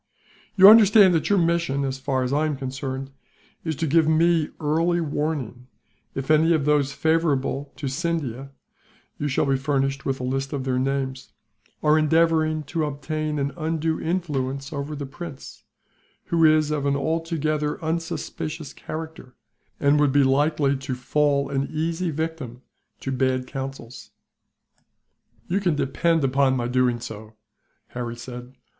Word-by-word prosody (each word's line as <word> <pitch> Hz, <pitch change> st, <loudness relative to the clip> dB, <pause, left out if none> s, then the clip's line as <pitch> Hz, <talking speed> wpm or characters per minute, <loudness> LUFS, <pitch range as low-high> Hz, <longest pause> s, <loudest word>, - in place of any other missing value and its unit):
"You 195 Hz, -1 st, +9 dB
understand 205 Hz, -3 st, +8 dB
that 160 Hz, -, 0 dB
your 205 Hz, -, +4 dB
mission, 170 Hz, -5 st, +1 dB
as 135 Hz, 0 st, -3 dB
far 130 Hz, -1 st, -1 dB
as 125 Hz, +2 st, -2 dB
I 155 Hz, +2 st, +2 dB
am 150 Hz, -3 st, -2 dB
concerned, 135 Hz, 0 st, -5 dB, 0.5 s
is 160 Hz, -2 st, -2 dB
to 165 Hz, +4 st, -2 dB
give 160 Hz, +1 st, +3 dB
me 160 Hz, 0 st, +3 dB
early 165 Hz, +3 st, +1 dB
warning, 145 Hz, -6 st, -3 dB, 0.5 s
if 135 Hz, +2 st, -2 dB
any 160 Hz, +2 st, +5 dB
of 150 Hz, -4 st, +1 dB
those 145 Hz, -2 st, +2 dB
favourable 145 Hz, -3 st, 0 dB
to 145 Hz, -, -5 dB
Scindia 140 Hz, -4 st, -3 dB, 0.7 s
you 145 Hz, -, -1 dB
shall 135 Hz, -, +1 dB
be 135 Hz, -1 st, +2 dB
furnished 135 Hz, 0 st, -1 dB
with 135 Hz, 0 st, -2 dB
a -, -, -5 dB
list 135 Hz, +2 st, -2 dB
of 140 Hz, -2 st, -2 dB
their 130 Hz, -1 st, 0 dB
names 135 Hz, 0 st, -2 dB, 0.5 s
are 155 Hz, +1 st, +4 dB
endeavouring 155 Hz, 0 st, +2 dB
to 155 Hz, +3 st, -2 dB
obtain 150 Hz, +1 st, -3 dB
an 140 Hz, 0 st, -1 dB
undue 160 Hz, -1 st, -1 dB
influence 140 Hz, -5 st, -2 dB
over 145 Hz, +1 st, -4 dB
the 145 Hz, -1 st, -5 dB
prince; 145 Hz, 0 st, -10 dB, 0.6 s
who 165 Hz, -1 st, +1 dB
is 155 Hz, -1 st, +4 dB
of 145 Hz, -2 st, -1 dB
an 140 Hz, -, +2 dB
altogether 155 Hz, 0 st, -1 dB
unsuspicious 160 Hz, -2 st, -4 dB
character, 160 Hz, -5 st, -8 dB, 0.4 s
and 145 Hz, +1 st, +3 dB
would 145 Hz, -2 st, +3 dB
be 140 Hz, +1 st, +4 dB
likely 140 Hz, +1 st, +2 dB
to 130 Hz, -1 st, -4 dB
fall 140 Hz, +2 st, +1 dB
an 135 Hz, 0 st, -1 dB
easy 165 Hz, +3 st, -1 dB
victim 150 Hz, -6 st, -5 dB, 0.4 s
to 135 Hz, -, -3 dB
bad 130 Hz, -1 st, 0 dB
counsels." 135 Hz, -2 st, -7 dB, 1.4 s
"You 185 Hz, +3 st, 0 dB
can 180 Hz, -6 st, +1 dB
depend 160 Hz, +3 st, +1 dB
upon 135 Hz, 0 st, +2 dB
my 120 Hz, -1 st, -1 dB
doing 125 Hz, -1 st, +1 dB
so," 110 Hz, -1 st, -9 dB, 0.5 s
Harry 120 Hz, -1 st, -5 dB
said. 125 Hz, +1 st, -9 dB
145 Hz, 150 wpm, -24 LUFS, 135-160 Hz, 1.4 s, You